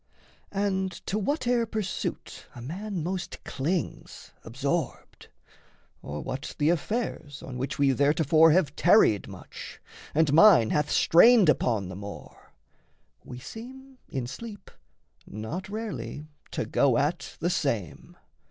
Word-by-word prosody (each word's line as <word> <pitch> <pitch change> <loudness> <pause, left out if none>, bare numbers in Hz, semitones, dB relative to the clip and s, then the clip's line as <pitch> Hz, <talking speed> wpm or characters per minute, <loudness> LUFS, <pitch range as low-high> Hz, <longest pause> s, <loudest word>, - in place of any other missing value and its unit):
And 190 -1 0
to 210 - -1
whate'er 245 -1 0
pursuit 215 -4 -4
A 120 - -9
man 185 - -5
most 180 +1 -5
clings 160 +5 -4
absorbed, 140 +5 -4 0.7
or 75 +1 -6
what 135 +2 -6
the 150 +2 +3
affairs 175 - -3
On 130 - -7
which 130 +2 -3
we 140 -1 +3
theretofore 155 +3 +4
have 150 -4 +2
tarried 175 - +4
much, - - -10 0.4
And 155 -2 +3
mind 165 - +7
hath 150 -1 +1
strained 215 +1 +6
upon 110 -9 +1
the 95 - -7
more, 100 +1 -10 0.7
we 125 - -9
seem 260 - -11
In 130 -3 -3
sleep 205 - -9 0.6
not 155 - -6
rarely 215 -8 -5 0.2
to - - -3
go 135 -4 +2
at 150 +5 -2
the 175 +2 0
same. 105 - -3
160 Hz, 125 wpm, -27 LUFS, 135-205 Hz, 0.7 s, mind